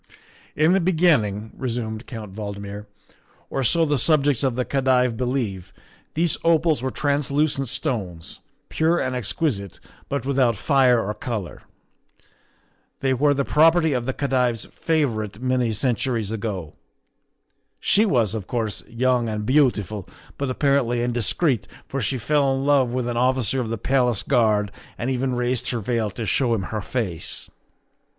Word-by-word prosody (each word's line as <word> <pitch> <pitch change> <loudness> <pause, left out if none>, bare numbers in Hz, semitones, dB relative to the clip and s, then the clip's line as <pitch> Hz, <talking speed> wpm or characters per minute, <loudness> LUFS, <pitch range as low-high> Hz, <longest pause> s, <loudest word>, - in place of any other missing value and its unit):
" - - -26
In 155 +4 +4
the 195 - +4
beginning," 150 - +2
resumed 115 -3 -4
Count 110 -6 -8
Valdmir, 100 0 -6 0.3
" - - -34
or 135 - -1
so 165 +7 +3
the 145 -3 +1
subjects 145 -2 +3
of 130 -3 +1
the 125 0 -1
Khedive 130 -3 +2
believe, 110 -7 -2 0.4
these 165 +1 +1
opals 165 -3 +3
were 130 - -1
translucent 140 0 0
stones, 105 - -4 0.3
pure 165 +2 +1
and 130 0 -1
exquisite, 120 - -2 0.3
but 140 -2 -2
without 130 -4 +2
fire 130 -4 +4
or 105 - -1
color. 105 - -5 1.4
They 135 -1 +2
were 145 +3 +3
the 140 0 0
property 160 0 +4
of 125 0 -2
a - - 0
Khedive's 125 -5 0
favor 145 -10 0
ite 105 0 -9
many 125 -2 +1
centuries 115 -1 -1
ago. 100 -7 -4 1.1
She 210 - +3
was, 120 - +2
of 105 -4 -5
course, 110 -4 -2
young 120 0 +1
and 105 -1 -3
beautiful, 110 - +1 0.3
but 140 -1 -3
apparently 130 -3 +1
indiscreet, 120 - 0 0.2
for 135 - -3
she 125 +4 0
fell 140 +3 +2
in 135 +1 -2
love 140 -3 +4
with 125 0 -2
an 120 -1 -2
officer 130 0 +1
of 115 - -4
the 115 - -2
Palace 125 -3 +1
Guard 105 -4 +2 0.3
and 120 +3 -2
even 130 0 -1
raised 125 0 -1
her 120 - -1
veil 115 0 -1
to 110 +4 -5
show 120 0 +2
him 100 - -2
her 110 - -1
face. 100 -8 -3
125 Hz, 155 wpm, -23 LUFS, 110-140 Hz, 1.4 s, In